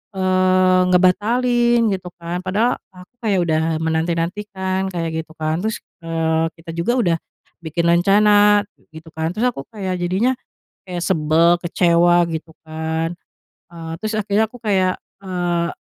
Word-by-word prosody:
eee, 185 0 +3
ngebatalin, 235 +5 +3
gitu 185 -2 -4
kan? 170 +1 -5
Padahal 205 +7 0 0.2
aku 180 +4 -15
kayak 210 -5 +1
udah 160 -2 +1 0.2
menanti-nantikan, 185 +4 -2
kayak 170 -3 -3
gitu 160 0 -17
kan, 155 +1 -1
terus, 220 +3 -3 0.2
eee, 165 -1 0
kita 165 0 -10
juga 170 +9 0
udah 175 -9 +2 0.4
bikin 170 +1 -3
rencana, 205 +4 +5 0.3
gitu 160 +1 -11
kan, 160 +2 -3
terus 225 - -1
aku 135 - -9
jadinya 190 +4 0 0.5
kayak 180 -2 -6
sebel, 165 -1 +3
kecewa, 175 0 +3
gitu 160 0 -5 0.2
kan, 160 +1 -3 0.6
ah 165 -1 -7
terus 215 0 -2
akhirnya 210 +1 +1
aku 245 - -12
kayak, 190 -5 +1 0.2
eee, 175 -2 -1
180 Hz, 135 wpm, -20 LUFS, 165-200 Hz, 0.6 s, rencana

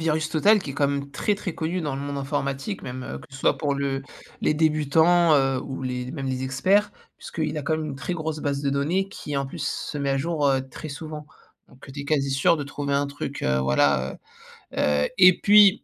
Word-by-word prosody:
Virus 155 -1 0
Total 210 +7 +5
qui 140 - -6
est - - -4
quand 140 0 +1
même 140 0 -3
très 205 +7 0
très 185 -4 -5
connu 170 +2 -2
dans 145 -3 -2
le 135 - -4
monde 140 0 -4
informatique, 140 +5 -3
même, 130 0 -6
heu, - - -6
que - - -14
ce 135 - -11
soit - - +1
pour 145 -2 0
le 135 -1 -2 0.4
les 150 - +2
débutants, 160 +2 +4
heu, 135 -2 +2
ou 135 -1 -6
les 125 0 -3
mêmes 135 -1 -5
les 130 0 -2
experts, 185 +11 +2 0.3
puisqu'il 155 -1 -3
a - - -4
quand 155 +3 0
même 155 - -3
une 145 - -4
très 175 +5 -3
grosse 155 -2 -3
base 140 0 -2
de 140 - +1
données, 170 +8 0
qui 145 -1 -5
en 140 - 0
plus 135 - -7
se 145 - -3
met 140 -1 -1
à 135 - +2
jour, 150 0 0
heu, 135 -1 +1
très 145 +4 -8
souvent. 150 0 -7 0.4
Donc, 130 +2 -16
heu, 135 - -10
tu 140 - -6
es 140 - -6
quasi 140 -3 +1
sûr 135 +5 +3
de 145 - -4
trouver 140 0 -3
un 140 0 +1
truc, 140 0 -6
heu, 65 0 +2
voilà, 65 0 +2 0.6
heu, - - -11
heu. 75 0 +2
Et 185 -1 +7
puis, 205 -1 +6
140 Hz, 245 wpm, -24 LUFS, 135-160 Hz, 0.6 s, Et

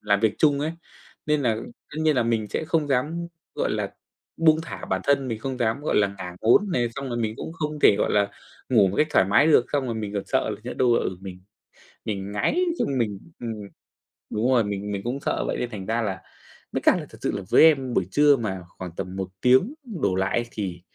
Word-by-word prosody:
làm 100 -1 +2
việc 110 -1 +2
chung 145 -2 +3
ấy, 155 +2 -1 0.5
nên 150 -1 +2
là 115 -4 +2 0.4
tất 150 - -9
nhiên 155 -2 +3
là 125 - +4
mình 115 -2 0
sẽ 130 - -2
không 160 -3 +1
dám, 150 +6 0 0.3
gọi - - -1
là, - - -3 0.4
buông 160 -1 +4
thả - - -7
bản 95 - -1
thân, 140 -2 +2
mình 115 -2 -3
không 130 +2 -4
dám, 115 +2 0
gọi 150 - 0
là, 105 - +5
ngả 90 -1 -7
ngốn 120 - +5
này, 120 -4 +1
xong 135 0 -4
rồi 120 - -3
mình 110 -2 -1
cũng - - -6
không 150 -2 -4
thể, 100 - +6
gọi - - +1
là, 100 -1 +2 0.4
ngủ 110 -6 +5
một 95 - -4
cách 155 - +4
thoải 135 - +4
mái 100 +10 +4
được. 150 -6 +5
Xong 140 -3 +1
rồi 115 - -2
mình 105 -2 -4
còn 100 - -2
sợ - - 0
nhỡ - - -5
đâu 125 -2 +3
là, - - +3
ừ, 95 - -3
mình 95 -1 -9 0.6
mình 100 -2 -4
ngáy 105 - +1 0.2
xong 135 -2 0
mình 105 -4 -1 0.2
ừm, 115 -2 -3 0.8
đúng 115 +5 0
rồi, 120 -3 +4
mình 100 0 -4
mình 100 -1 -3
cũng 125 +4 -2
sợ - - -1
vậy - - -1
nên 125 - -2
thành 100 -4 -7
ra 115 +3 0
là 100 -4 -3 0.5
với - - -2
cả - - +5
là - - -6
thật - - -14
sự - - 0
là - - -5
với - - +6
em 135 -6 +4
buổi 95 -5 +1
trưa 145 -1 +5
mà 95 -5 -3 0.2
khoảng 90 -2 -6
tầm 95 0 -5
1 95 -1 -3
tiếng 130 - +4 0.3
đổ 95 -2 +2
lại 95 +5 0
thì 95 -5 -4
115 Hz, 245 wpm, -25 LUFS, 100-140 Hz, 0.8 s, thể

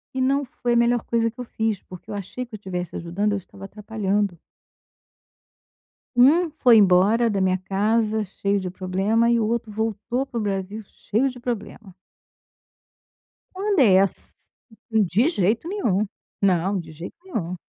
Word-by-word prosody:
E 260 - 0
não 275 +2 +1
foi 240 0 -2
a - - +2
melhor 235 0 +3
coisa 230 -1 0
que 245 - -22
eu - - -3
fiz 220 -4 -2
porque 180 -1 -13
eu - - -4
achei 205 +6 -5
que 235 - -28
eu - - -5
estivesse 180 -3 -5
ajudando; 185 +5 -1
eu 205 - 0
estava 195 +1 -11
atrapalhando. 205 -3 -2 1.8
Um 310 +7 +5
foi 240 -3 +7
embora 205 +4 +4
da 200 -3 0
minha 185 0 +2
casa 215 +3 0
cheio 200 +1 -1
de 185 - -4
problema 195 +6 +1
e 235 - +3
o 220 - +1
outro 230 -1 -2
voltou 225 +4 -2
para 240 - -6
o - - -2
Brasil 200 +2 -3
cheio 230 +7 -1
de 255 -2 -6
problema. 225 -4 -6 1.6
Quando 395 -1 0
é 190 -6 +6
ass 195 -1 +2 0.6
de 220 - +3
jeito 220 - 0
nenhum. 225 - 0 0.4
Não, 190 0 +2
de 160 -2 -9
jeito 165 +3 -9
nenhum. 185 - -4
210 Hz, 165 wpm, -23 LUFS, 190-235 Hz, 1.8 s, foi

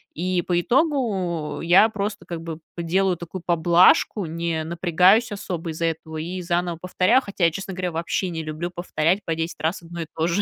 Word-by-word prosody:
и 180 +1 0
по 175 0 0
итогу 210 - 0
я 180 +6 +6
просто, 210 0 -4
как 170 -2 -6
бы 165 -1 -5 0.2
п 170 - -4
делаю 185 +2 +1
такую 170 +1 -8
поблажку, 175 +4 +4
не 165 0 -2
напрягаюсь 180 +7 +3
особо 180 -4 -4
из-за 160 +1 -2
этого, 160 -1 -3
и 175 +4 -4
заново 175 -1 -1
повторяю, 185 +7 +3
хотя 200 -5 -5
я, 165 - +4
честно 195 +2 -6
говоря, 180 -1 -2
вообще 170 +3 -2
не 165 -2 -4
люблю 155 +3 -4
повторять 175 +2 0
по 165 - -2
10 165 0 -4
раз 165 +2 -1
одно 170 0 -7
и 160 - -5
то 160 - 0
же. 175 +4 +1
175 Hz, 195 wpm, -23 LUFS, 165-190 Hz, 0.2 s, я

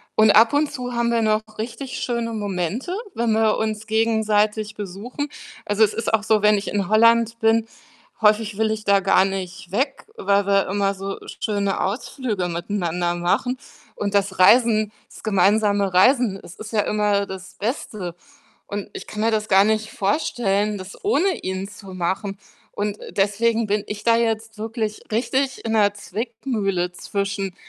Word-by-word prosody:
und 215 -1 +6
ab 225 +2 +6
und 290 0 +2
zu 250 -3 -5
haben 235 0 +1
wir 230 -1 +2
noch 215 0 +2 0.2
richtig 240 +4 -5
schöne 235 -2 -2
Momente, 205 - -2 0.2
wenn 235 -1 +1
wir 220 -1 +3
uns 215 0 -2
gegenseitig 215 -1 +1
besuchen. 215 +9 -5 0.4
Also, 205 +2 +3
es 205 - -4
ist 230 -1 -2
auch 215 -1 +3
so, 215 -1 +3
wenn 210 0 +5
ich 200 - -4
in 200 -1 -1
Holland 230 +1 +4
bin 225 0 +3 0.6
häufig 210 -1 +3
will 220 0 +1
ich 215 0 -4
da 200 -1 +4
gar 190 - +4
nicht 190 -2 -5
weg, 270 +5 -1
weil 200 - +2
wir 195 -1 +3
immer 200 0 +1
so 195 +1 -5 0.2
schöne 200 -2 0
Ausflüge 210 -2 -2
miteinander 175 0 -2
machen 215 +9 0 0.4
und 205 0 -2
das 195 -1 0
Reisen 215 +1 +5 0.2
das - - -14
gemeinsame 200 -1 +2
Reisen, 220 0 +4
es 175 - -12
ist 215 0 -9
ja 215 - +2
immer 210 -1 +1
das 190 0 -9
Beste 205 - -4 0.5
und 205 0 -5
ich - - -7
kann 210 - -5
mir 225 +1 +2
das 215 0 -1
gar 195 +1 +6
nicht 215 0 0
vorstellen, 205 -2 0
das 190 +1 -9
ohne 385 -2 +2
ihn 190 +1 -3
zu 195 -2 -11
machen 190 +3 -2 0.3
und, 205 0 -3
äh, - - -9
deswegen 220 +3 +1
bin 205 0 0
ich 210 0 -6
da 230 0 +5
jetzt 225 -1 -1
wirklich 220 -1 -3
richtig 260 +3 -1
in 225 - -1
'ner 205 -2 +4
Zwickmühle 205 -5 -3
zwischen: 200 -1 -3
210 Hz, 170 wpm, -22 LUFS, 195-225 Hz, 0.6 s, und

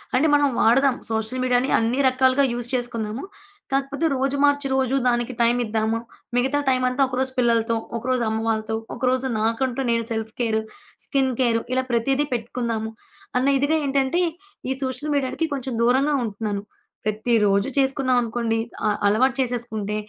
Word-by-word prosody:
అంటే 280 +5 +4
మనం 290 0 +4
వాడదాం 265 +3 +4 0.2
సోషల్ 220 +3 -2
మీడియాని 250 +1 +2
అన్ని 230 +4 0
రకాలుగా 260 +1 +3
యూజ్ 240 0 -4
చేసుకుందాము. 235 -1 -3 0.5
కాకపోతే, 275 +3 0
రోజు 270 +1 0
మార్చి 285 -1 +3
రోజు 265 0 +1
దానికి 240 +1 0
టైమిద్దాము 230 -2 +1 0.4
మిగతా 265 +4 +2
టైమంతా 255 +1 +1
ఒకరోజు 260 +1 -2
పిల్లలతో, 230 -2 +2 0.2
ఒకరోజు 250 +1 0
అమ్మ 220 0 -1
వాళ్ళతో, 220 0 -1 0.2
ఒకరోజు 255 +1 0
నాకంటూ 235 +4 0
నేను 230 0 +1
సెల్ఫ్ 220 -1 -3
కేరు 220 -2 +1 0.4
స్కిన్ 270 -2 +1
కేరు 235 -3 +2
ఇలా 260 0 +1
ప్రతీదీ 265 +5 +1
పెట్టుకుందాము, 230 -1 -2 0.5
అన్న 255 +2 +2
ఇదిగా 285 +4 +2
ఏంటంటే 275 +3 +1 0.5
ఈ - - 0
సోషల్ 270 +3 -3
మీడియాకి 280 +3 0
కొంచెం 265 -2 -3
దూరంగా 265 +5 +3
ఉంటున్నాను. 205 -1 -3 0.4
ప్రతిరోజు 215 -1 +2
చేసుకున్నాం 265 -1 +2
అనుకోండి, 230 -1 -1 0.3
అ - - +3 0.2
అలవాటు 255 +6 +3
చేసేసుకుంటే 235 -4 -2
245 Hz, 140 wpm, -23 LUFS, 225-265 Hz, 0.5 s, అంటే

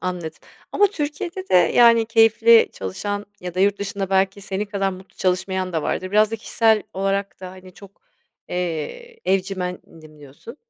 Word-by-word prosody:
Anladım. 180 -3 -4 0.4
Ama 410 - +4
Türkiye'de 345 +2 -5
de - - 0
yani 230 +4 +5
keyifli 225 0 +5
çalışan 205 - -5
ya 180 -1 -7
da 185 - -1
yurt 200 +1 +2
dışında 195 -1 -4
belki 195 +1 +1
senin 195 +1 -3
kadar 200 -2 -2
mutlu 185 +1 -12
çalışmayan 185 0 -1
da 160 - -1
vardır. 185 +4 -3
Biraz 215 +1 +3
da 225 - -3
kişisel 220 0 +1
olarak 195 0 -2
da 185 - -7
hani 185 0 -14
çok, 200 - -16 0.5
eee, 180 - -5
evcimendim 180 -5 -4
diyorsun. 145 - -13
195 Hz, 155 wpm, -21 LUFS, 185-225 Hz, 0.5 s, yani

